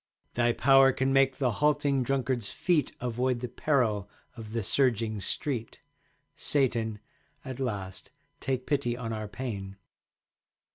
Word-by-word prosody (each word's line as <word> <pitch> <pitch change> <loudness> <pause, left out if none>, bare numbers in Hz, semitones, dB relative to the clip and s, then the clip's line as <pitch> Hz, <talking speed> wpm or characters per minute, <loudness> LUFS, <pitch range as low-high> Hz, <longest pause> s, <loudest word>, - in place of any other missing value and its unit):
Thy 120 0 +3
power 135 +2 +6
can 130 +1 0
make 135 -1 +4
the 130 -3 +1
halting 145 +2 +2
Drunkard's 130 -3 0
feet 165 -7 +1
Avoid 125 +1 0
the 125 - -3
peril 115 -6 0 0.3
of 110 -3 -9
the 115 -1 -2
surging 115 -3 +1
street. 120 +1 -3 0.6
Satan, 115 -6 0 0.5
at 130 -1 -6
last 100 -7 -4 0.3
take 130 -1 -2
pity 130 -5 0
on 115 -2 -4
our 110 -1 -4
pain. 100 -4 -6
125 Hz, 130 wpm, -29 LUFS, 110-135 Hz, 0.6 s, power